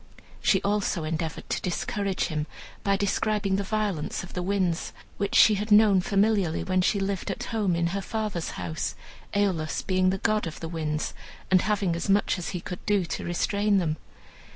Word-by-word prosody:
She 190 Hz, -, +3 dB
also 200 Hz, -4 st, 0 dB
endeavored 160 Hz, 0 st, -3 dB
to -, -, 0 dB
discourage 195 Hz, +2 st, -1 dB
him, 155 Hz, -2 st, -2 dB, 0.4 s
by 200 Hz, -1 st, +2 dB
describing 205 Hz, 0 st, +1 dB
the 200 Hz, -, -1 dB
violence 200 Hz, -7 st, -2 dB
of 180 Hz, -, -10 dB
the 180 Hz, -, -2 dB
winds, 180 Hz, -3 st, 0 dB, 0.2 s
which 200 Hz, 0 st, -1 dB
she 215 Hz, -, +8 dB
had 210 Hz, +1 st, -2 dB
known 210 Hz, -3 st, +6 dB
familiarly 200 Hz, -3 st, +2 dB
when 185 Hz, -1 st, +1 dB
she 200 Hz, +2 st, +2 dB
lived 195 Hz, -1 st, -2 dB
at -, -, -3 dB
home 205 Hz, -6 st, 0 dB
in 170 Hz, 0 st, +1 dB
her 200 Hz, -, -1 dB
father's 210 Hz, -4 st, -3 dB
house, 85 Hz, -3 st, -3 dB, 0.4 s
Aeolus 185 Hz, -6 st, 0 dB
being 185 Hz, -1 st, +2 dB
the 190 Hz, -, 0 dB
god 215 Hz, -1 st, +1 dB
of 155 Hz, -, -7 dB
the 165 Hz, -, -5 dB
winds, 155 Hz, -2 st, -2 dB, 0.4 s
and 185 Hz, -1 st, +6 dB
having 200 Hz, -5 st, +1 dB
as 170 Hz, +3 st, -3 dB
much 195 Hz, -1 st, +3 dB
as 175 Hz, -, -4 dB
he 180 Hz, -, -4 dB
could 180 Hz, -, -7 dB
do 205 Hz, -3 st, +3 dB
to -, -, -4 dB
restrain 200 Hz, +4 st, +1 dB
them. 160 Hz, -4 st, 0 dB
190 Hz, 185 wpm, -27 LUFS, 170-205 Hz, 0.4 s, she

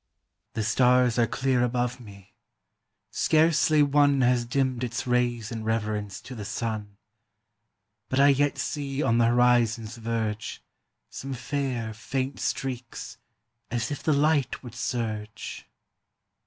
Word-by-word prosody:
"The 110 Hz, -, -1 dB
stars 125 Hz, +2 st, +3 dB
are 115 Hz, -, +4 dB
clear 130 Hz, 0 st, +1 dB
above 125 Hz, +1 st, -1 dB
me; 100 Hz, -3 st, -14 dB, 0.8 s
scarcely 155 Hz, -1 st, +4 dB
one 145 Hz, -1 st, +4 dB
Has 125 Hz, -1 st, +3 dB
dimmed 130 Hz, 0 st, 0 dB
its 125 Hz, +1 st, -3 dB
rays 120 Hz, -2 st, 0 dB
in 115 Hz, -1 st, -4 dB
reverence 105 Hz, -3 st, -2 dB
to 130 Hz, -, -9 dB
the 110 Hz, -4 st, -6 dB
sun; 105 Hz, -2 st, -4 dB, 1.1 s
But 130 Hz, -, 0 dB
I 140 Hz, +1 st, +7 dB
yet 145 Hz, +1 st, +2 dB
see 140 Hz, -1 st, -2 dB
on 115 Hz, +1 st, +3 dB
the 115 Hz, -, +5 dB
horizon's 120 Hz, -1 st, +2 dB
verge 110 Hz, -2 st, -3 dB, 0.5 s
Some 135 Hz, 0 st, -5 dB
fair, 125 Hz, -3 st, -3 dB
faint 130 Hz, +4 st, -3 dB
streaks, 130 Hz, -3 st, -4 dB, 0.5 s
as 120 Hz, +1 st, -2 dB
if 145 Hz, -, -4 dB
the 155 Hz, -, +1 dB
light 145 Hz, -3 st, +2 dB
would 120 Hz, -3 st, -9 dB
surge." 110 Hz, -3 st, -4 dB
125 Hz, 130 wpm, -26 LUFS, 115-135 Hz, 1.1 s, I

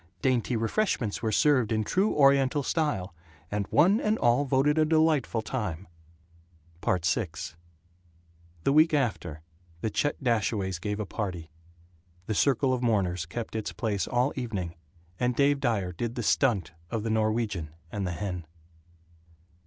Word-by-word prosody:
Dainty 125 Hz, -2 st, +1 dB
refreshments 115 Hz, -, 0 dB
were 110 Hz, -1 st, 0 dB
served 130 Hz, -5 st, +3 dB
in 110 Hz, -1 st, +1 dB
true 190 Hz, -, +1 dB
Oriental 140 Hz, 0 st, +4 dB
style, 110 Hz, -, -1 dB, 0.4 s
and 105 Hz, -1 st, -1 dB
one 185 Hz, +9 st, +4 dB
and 215 Hz, +1 st, +1 dB
all 120 Hz, +4 st, +3 dB
voted 140 Hz, +3 st, +2 dB
a -, -, +5 dB
delightful 155 Hz, -7 st, +2 dB
time. 100 Hz, -8 st, -4 dB, 1.0 s
VI 90 Hz, +4 st, +1 dB, 1.4 s
The 135 Hz, -, +2 dB
week 155 Hz, +1 st, +5 dB
after, 95 Hz, -, -2 dB, 0.4 s
the 110 Hz, -, -1 dB
Chet 145 Hz, +6 st, 0 dB
Dashaways 105 Hz, -6 st, 0 dB
gave 105 Hz, +3 st, -3 dB
a 105 Hz, -, -2 dB
party. 90 Hz, -6 st, -5 dB, 0.7 s
The 110 Hz, -, -2 dB
circle 135 Hz, +3 st, +2 dB
of 125 Hz, -, -1 dB
mourners 95 Hz, -8 st, 0 dB
kept 110 Hz, +7 st, -6 dB
its 110 Hz, -2 st, -3 dB
place 105 Hz, -4 st, -1 dB
all 125 Hz, +3 st, +1 dB
evening, 100 Hz, -10 st, -3 dB, 0.5 s
and 125 Hz, 0 st, +1 dB
Dave 140 Hz, +1 st, +3 dB
Dyer 110 Hz, -9 st, 0 dB
did 115 Hz, +7 st, -4 dB
the 120 Hz, -, -3 dB
"stunt" 110 Hz, -3 st, +2 dB, 0.2 s
of 110 Hz, +2 st, -2 dB
the 115 Hz, -, -1 dB
Norwegian 110 Hz, -6 st, 0 dB, 0.2 s
and 100 Hz, -3 st, -2 dB
the 90 Hz, -, -2 dB
hen. 90 Hz, -3 st, -4 dB
115 Hz, 145 wpm, -28 LUFS, 100-135 Hz, 1.4 s, a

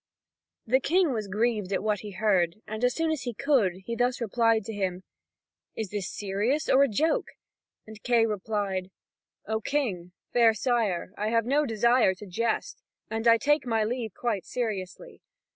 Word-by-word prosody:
The 255 Hz, +4 st, +3 dB
King 340 Hz, +1 st, +2 dB
was 215 Hz, -3 st, -3 dB
grieved 210 Hz, -1 st, 0 dB
at 195 Hz, -, -1 dB
what 210 Hz, -2 st, 0 dB
he 210 Hz, -, -8 dB
heard, 185 Hz, -4 st, +1 dB
and 215 Hz, +2 st, -6 dB
as 250 Hz, 0 st, +2 dB
soon 325 Hz, -1 st, 0 dB
as 310 Hz, -3 st, -2 dB
he 245 Hz, -3 st, -5 dB
could, 205 Hz, -10 st, +1 dB
he 235 Hz, -, -3 dB
thus 245 Hz, +2 st, 0 dB
replied 230 Hz, -1 st, +1 dB
to 225 Hz, -, -5 dB
him: 190 Hz, -2 st, -2 dB, 0.7 s
"Is 220 Hz, -4 st, -4 dB
this 205 Hz, -3 st, -3 dB
serious, 210 Hz, +9 st, -1 dB
or 265 Hz, -, +5 dB
a 280 Hz, -, +5 dB
joke?" 305 Hz, +9 st, +1 dB, 0.6 s
And 220 Hz, -1 st, -12 dB
Kay 235 Hz, -1 st, +3 dB
replied: 200 Hz, -3 st, -2 dB, 0.6 s
"O 220 Hz, +1 st, -2 dB
King, 200 Hz, -11 st, -2 dB, 0.2 s
fair 230 Hz, -2 st, +5 dB
sire, 215 Hz, -7 st, 0 dB
I 210 Hz, -, 0 dB
have 230 Hz, 0 st, +2 dB
no 285 Hz, +4 st, +2 dB
desire 230 Hz, -2 st, +3 dB
to 210 Hz, -, -11 dB
jest, 230 Hz, -, -2 dB, 0.3 s
and 225 Hz, +1 st, -1 dB
I 230 Hz, 0 st, +7 dB
take 295 Hz, +2 st, +1 dB
my 225 Hz, -2 st, +1 dB
leave 225 Hz, -2 st, -3 dB
quite 225 Hz, -6 st, -2 dB
seriously. 220 Hz, -, -5 dB
225 Hz, 175 wpm, -27 LUFS, 200-245 Hz, 0.7 s, I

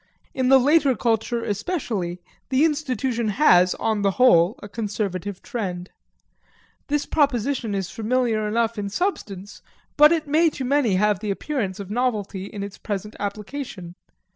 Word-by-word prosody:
In 255 Hz, -1 st, 0 dB
the 270 Hz, -, +8 dB
later 280 Hz, 0 st, +3 dB
culture 230 Hz, +1 st, 0 dB
especially, 205 Hz, -, -3 dB, 0.3 s
the 270 Hz, +3 st, +3 dB
institution 260 Hz, -6 st, -1 dB
has, 185 Hz, -6 st, +4 dB
on 220 Hz, -2 st, -1 dB
the 200 Hz, -, +3 dB
whole, 210 Hz, -7 st, +5 dB
a -, -, -6 dB
conservative 205 Hz, -3 st, -4 dB
trend. 185 Hz, -6 st, -5 dB, 1.0 s
This 290 Hz, 0 st, 0 dB
proposition 260 Hz, -6 st, 0 dB
is 190 Hz, -2 st, -3 dB
familiar 225 Hz, -1 st, 0 dB
enough 230 Hz, +1 st, 0 dB
in 200 Hz, -1 st, -3 dB
substance, 205 Hz, -, -4 dB, 0.4 s
but 300 Hz, +1 st, +8 dB
it 320 Hz, -3 st, 0 dB
may 320 Hz, +3 st, +4 dB
to 265 Hz, -, -3 dB
many 255 Hz, -6 st, +2 dB
have 205 Hz, 0 st, +2 dB
the 210 Hz, -, -4 dB
appearance 200 Hz, -3 st, -3 dB
of 200 Hz, 0 st, -7 dB
novelty 210 Hz, -5 st, -1 dB
in 200 Hz, 0 st, -6 dB
its 200 Hz, -1 st, -8 dB
present 210 Hz, 0 st, -5 dB
application. 205 Hz, -2 st, -6 dB
220 Hz, 145 wpm, -23 LUFS, 200-265 Hz, 1.0 s, the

